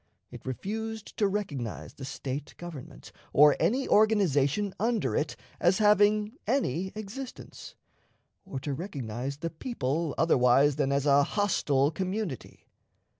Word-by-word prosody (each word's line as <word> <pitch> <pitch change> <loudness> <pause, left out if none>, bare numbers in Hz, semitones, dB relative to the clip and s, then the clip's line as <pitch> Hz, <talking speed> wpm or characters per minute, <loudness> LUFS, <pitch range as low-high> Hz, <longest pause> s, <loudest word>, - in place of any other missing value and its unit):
It - - -11
refused 220 - -5
to 205 - +3
recognize 160 - -4
the 135 - -8
State 135 +1 -5
government, 170 -7 -9 0.2
or 150 0 +7
any 260 +4 +1
organization 200 -4 +3
under 210 - 0
it, 150 - -1 0.2
as 180 +2 +3
having 210 +2 +3
any 190 - 0
existence, 220 +5 -8 0.7
or 135 - -6
to 145 - -3
recognize 135 - -5
the 165 +2 -4
people 160 - -2
otherwise 135 -2 +4
than 140 -2 +1
as 140 0 +1
a 140 -1 +5
hostile 145 -6 +1
community. 185 - -4
165 Hz, 125 wpm, -28 LUFS, 140-210 Hz, 0.7 s, or